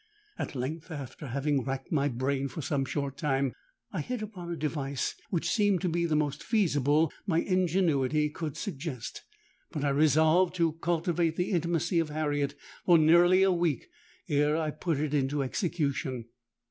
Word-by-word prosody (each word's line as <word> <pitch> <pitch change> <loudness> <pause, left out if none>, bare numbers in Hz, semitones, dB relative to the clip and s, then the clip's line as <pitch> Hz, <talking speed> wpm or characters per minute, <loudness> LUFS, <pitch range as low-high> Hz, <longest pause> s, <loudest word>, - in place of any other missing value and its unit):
At - - -4
length, 150 +7 -4
after 145 -2 -7
having 140 +1 0
racked 135 +1 -4
my 145 -2 +2
brain 135 +2 -1
for 155 +2 -6
some 135 -1 0
short 140 0 -3
time, 135 -4 0 0.4
I 175 - -1
hit 245 - -4
upon 185 -5 -7
a - - -2
device 140 -3 -2 0.2
which 170 - -1
seemed 205 -5 +2
to 185 - 0
be 170 +1 0
the 155 - +1
most 150 -1 0
feasible 155 - +2
my 170 -3 +2
ingenuity 160 -6 +2
could 155 -3 -5
suggest; 145 - -5 0.5
but 145 - -3
I 145 - +2
resolved 155 +5 +4
to 165 -3 +2
cultivate 170 0 0
the 180 +3 -1
intimacy 170 -1 +1
of 165 -2 0
Harriet 145 -2 -1 0.3
for 175 -2 +6
nearly 175 +4 +6
a 195 - +4
week 175 - 0 0.4
ere 150 0 +2
I 155 -2 -1
put 155 +1 -2
it 150 0 -1
into 140 0 +1
execution. 140 - -2
155 Hz, 165 wpm, -29 LUFS, 140-170 Hz, 0.5 s, for